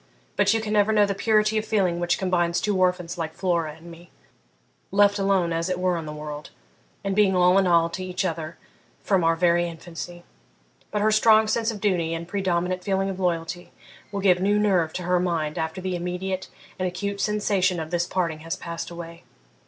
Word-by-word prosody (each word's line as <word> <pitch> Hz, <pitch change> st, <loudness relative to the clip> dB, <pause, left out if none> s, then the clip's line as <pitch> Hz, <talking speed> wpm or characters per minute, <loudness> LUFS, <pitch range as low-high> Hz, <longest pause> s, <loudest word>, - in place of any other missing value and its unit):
but 205 Hz, 0 st, +3 dB
you 225 Hz, -, +2 dB
can 215 Hz, -1 st, -3 dB
never 210 Hz, 0 st, +3 dB
know 210 Hz, -1 st, +4 dB
the 200 Hz, -, -1 dB
purity 215 Hz, +1 st, +2 dB
of -, -, -4 dB
feeling 185 Hz, -6 st, +1 dB
which 175 Hz, 0 st, +1 dB
combines 175 Hz, -2 st, +1 dB
two 210 Hz, -2 st, 0 dB
orphans 180 Hz, -1 st, 0 dB
like 160 Hz, -1 st, -4 dB
Flora 170 Hz, -5 st, -1 dB
and 165 Hz, +2 st, -13 dB
me, 170 Hz, 0 st, -14 dB, 0.8 s
left 200 Hz, +1 st, +3 dB
alone 195 Hz, -4 st, +1 dB
as 165 Hz, +2 st, -1 dB
it 180 Hz, -, -1 dB
were 180 Hz, 0 st, +1 dB
in 165 Hz, -2 st, -5 dB
the -, -, -5 dB
world, 150 Hz, 0 st, -7 dB, 0.5 s
and 195 Hz, -1 st, -1 dB
being 200 Hz, -2 st, +4 dB
all 180 Hz, +1 st, +5 dB
in 190 Hz, -, +2 dB
all 170 Hz, -1 st, +4 dB
to 175 Hz, +2 st, -6 dB
each 185 Hz, +1 st, -2 dB
other 165 Hz, -1 st, -4 dB, 0.5 s
from 190 Hz, -4 st, +2 dB
our 165 Hz, 0 st, +3 dB
very 175 Hz, 0 st, +2 dB
infancy. 175 Hz, +1 st, -8 dB, 0.7 s
But 210 Hz, -1 st, -1 dB
her 215 Hz, -, +3 dB
strong 215 Hz, 0 st, +5 dB
sense 225 Hz, +1 st, 0 dB
of 220 Hz, -3 st, -4 dB
duty 175 Hz, -5 st, 0 dB
and 165 Hz, 0 st, -6 dB
predominant 180 Hz, -1 st, -1 dB
feeling 195 Hz, 0 st, 0 dB
of 190 Hz, -, -7 dB
loyalty 175 Hz, -1 st, -2 dB, 0.4 s
will 200 Hz, -1 st, -3 dB
give 185 Hz, -2 st, +4 dB
new 205 Hz, +2 st, +2 dB
nerve 190 Hz, -6 st, +2 dB
to 180 Hz, -, -4 dB
her 180 Hz, +1 st, +2 dB
mind 165 Hz, -3 st, -1 dB
after 160 Hz, +2 st, -3 dB
the 185 Hz, -1 st, -2 dB
immediate 180 Hz, +2 st, -3 dB, 0.3 s
and 185 Hz, -, 0 dB
acute 200 Hz, +3 st, -3 dB
sensation 200 Hz, -4 st, +1 dB
of 160 Hz, 0 st, -6 dB
this 175 Hz, 0 st, 0 dB
parting 170 Hz, -4 st, -1 dB
has 165 Hz, +3 st, -4 dB
passed 170 Hz, 0 st, -6 dB
away. 170 Hz, -1 st, -9 dB
180 Hz, 205 wpm, -24 LUFS, 170-200 Hz, 0.8 s, all